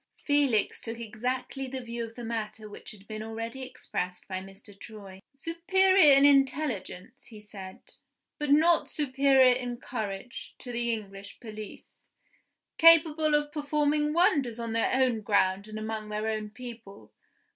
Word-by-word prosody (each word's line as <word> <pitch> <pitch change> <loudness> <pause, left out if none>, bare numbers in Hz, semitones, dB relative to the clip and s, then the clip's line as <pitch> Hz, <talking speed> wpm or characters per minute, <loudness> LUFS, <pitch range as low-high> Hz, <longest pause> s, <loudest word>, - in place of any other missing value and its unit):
Felix 280 -7 +1
took 230 0 -6
exactly 250 +4 -4
the 260 +1 -5
view 235 -1 -5
of 230 0 -9
the 240 - -8
matter 220 -1 -5
which 205 - -11
had 200 -1 -13
been 215 -1 -6
already 225 +3 -6
expressed 250 -8 -5
by 185 -1 -4
Mr. 195 +2 -14
Troy. 200 -2 -11
"Superior 340 +2 +4
in 275 - +6
intelligence," 270 -9 +1
he 220 -3 -12
said, 195 -3 -10 0.6
"but 295 -1 -2
not 325 +4 +4
superior 270 -2 +4
in 245 -1 -4
courage, 220 -2 -6
to 245 - -9
the 235 0 0
English 200 -3 -7
police. 215 -2 -10 0.7
Capable 320 -2 +6
of 295 0 0
performing 295 0 0
wonders 285 -8 +2
on 230 -1 -4
their 230 - +1
own 255 -4 +2
ground 200 -1 +1
and 215 0 -7
among 215 0 -5
their 210 +1 -3
own 215 -1 -2
people. 230 -3 -11
235 Hz, 145 wpm, -28 LUFS, 215-280 Hz, 0.7 s, in